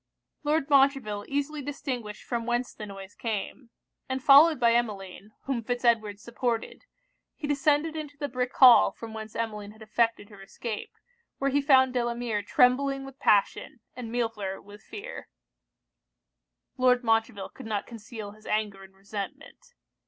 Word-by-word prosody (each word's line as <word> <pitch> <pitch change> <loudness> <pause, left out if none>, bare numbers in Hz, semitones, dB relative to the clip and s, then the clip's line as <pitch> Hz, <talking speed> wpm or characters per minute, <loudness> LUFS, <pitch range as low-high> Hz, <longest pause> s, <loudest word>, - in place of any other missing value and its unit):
Lord 300 -1 +1
Montreville 270 -8 +2
easily 285 +2 -2
distinguished 255 -6 -5
from 235 -2 -3
whence 240 +1 -1
the 210 - -8
noise 195 0 -10
came; 230 +2 -5 0.4
and 260 0 -3
followed 295 +2 +7
by 235 -1 +4
Emmeline, 210 -3 -3
whom 260 -4 -2
Fitz 245 +2 -3
Edward 215 -3 +2
supported, 235 - -3 0.5
he 310 - -6
descended 295 +2 +1
into 295 -2 -7
the 285 - -3
brick 250 -1 -2
hall 255 -3 +8
from 225 -1 -10
whence 220 -1 -8
Emmeline 210 -2 -4
had 220 0 -14
effected 225 -1 0
her 205 -2 -14
escape, 210 +2 -6 0.5
where 275 0 0
he 285 +2 +2
found 260 -2 +5
Delamere 240 -3 -1
trembling 270 +5 +2
with 270 -1 -12
passion, 205 +2 +1 0.2
and 235 -2 -7
Millefleur 225 -5 -2
with 205 +1 -14
fear. 415 - -9 1.5
Lord 250 -1 +3
Montreville 225 -3 0
could - - -11
not 210 -2 -2
conceal 225 -2 -9
his 215 +1 -16
anger 210 -2 -1
and 190 0 -16
resentment. 275 - -8
235 Hz, 150 wpm, -27 LUFS, 210-270 Hz, 1.5 s, hall